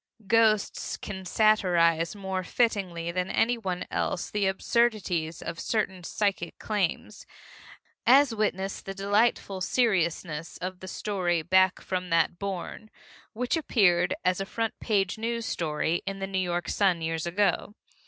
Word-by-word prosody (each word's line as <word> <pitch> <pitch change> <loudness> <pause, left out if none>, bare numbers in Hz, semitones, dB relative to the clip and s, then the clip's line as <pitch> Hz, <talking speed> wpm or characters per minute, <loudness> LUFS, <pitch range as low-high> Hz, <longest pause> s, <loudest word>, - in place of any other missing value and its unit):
Ghosts 215 0 +2
can 190 -2 -7
satirize 175 -5 +3
more 190 -2 -3
fittingly 180 -7 0
than 180 +1 -2
anyone 225 -6 0
else 175 - -2
the 205 -2 +1
absurdities 190 -6 0
of 170 0 -5
certain 190 -5 -1
psychic 195 -2 -2
claims, 205 -6 -2 0.8
as 270 0 +6
witness 195 -3 -1
the 195 - -7
delightful 200 -1 +1
seriousness 170 -8 0
of 185 0 -5
the 185 - -9
story 180 -4 -1
Back 185 +2 +3
from 185 -1 -3
that 165 +1 +2
Bourne, 200 +2 -5 0.4
which 245 +6 -1
appeared 185 - +3
as 185 +1 +2
a - - -2
front 225 +1 -2
page 200 -2 0
news 230 0 -2
story 160 -1 -1
in 195 0 -3
the 195 - -3
New 195 -1 -2
York 175 -1 -1
Sun 185 -5 +1
years 160 0 -2
ago. 205 +3 0
190 Hz, 135 wpm, -27 LUFS, 175-215 Hz, 0.8 s, as